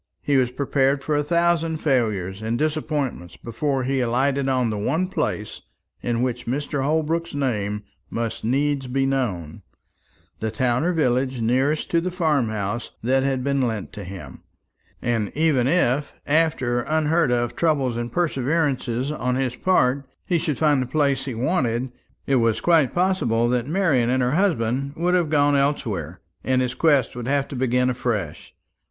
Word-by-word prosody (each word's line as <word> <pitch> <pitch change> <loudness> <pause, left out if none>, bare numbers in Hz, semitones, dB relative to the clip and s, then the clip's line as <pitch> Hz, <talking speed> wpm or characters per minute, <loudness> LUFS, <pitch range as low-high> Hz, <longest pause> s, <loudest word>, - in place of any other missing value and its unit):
He 145 - +1
was 130 -2 +3
prepared 135 +1 0
for 155 - 0
a 145 - +2
thousand 165 +1 +1
failures 110 - 0
and 110 +2 -1
disappointments 150 - -2
before 135 +3 -2
he 135 +1 0
alighted 135 +3 +1
on 125 -3 +1
the 105 - -3
one 155 - 0
place 105 - -3 0.4
in 120 0 -1
which 125 -2 -3
Mr. 145 +2 -2
Holbrook's 160 +2 0
name 105 -7 -1 0.3
must 115 -1 -3
needs 135 +3 0
be 135 +2 0
known, 105 - -2 0.8
the 110 - -2
town 120 +3 0
or 175 - +2
village 130 -5 0
nearest 130 +7 +1
to 170 - +3
the 185 - -2
farm 155 - +1
house 105 +2 -3
that 130 +3 +2
had 135 -1 0
been 140 0 +1
lent 110 -5 -2
to 105 - -7
him. 90 -8 -9 0.6
And 115 -4 0
even 145 -5 +2
if, 145 -3 +1
after 145 -6 +1
unheard 155 0 +1
of 120 -1 0
trouble 140 -7 +1
and 120 0 -4
perseverance 150 -4 0 0.2
on 125 -4 -1
his 130 -2 -1
part, 140 -7 +2 0.2
he 175 -2 +1
should 155 -4 -2
find 150 -4 +3
the 130 - -3
place 140 -1 +1
he 130 -4 -4
wanted, 125 -2 0 0.3
it 135 - +2
was 115 -2 +2
quite 160 -1 +3
possible 175 -11 +2
that 125 0 0
Marian 150 -9 +2
and 130 0 +2
her 125 - +1
husband 140 - 0
would 175 +2 0
have 175 -4 +2
gone 145 -1 +3
elsewhere, 110 - -1 0.2
and 130 0 +2
his 125 0 -2
quest 145 -7 +2
would 120 -1 -5
have 140 0 +1
to - - -6
begin 125 0 +1
afresh. 115 -10 -3
130 Hz, 165 wpm, -23 LUFS, 120-150 Hz, 0.8 s, was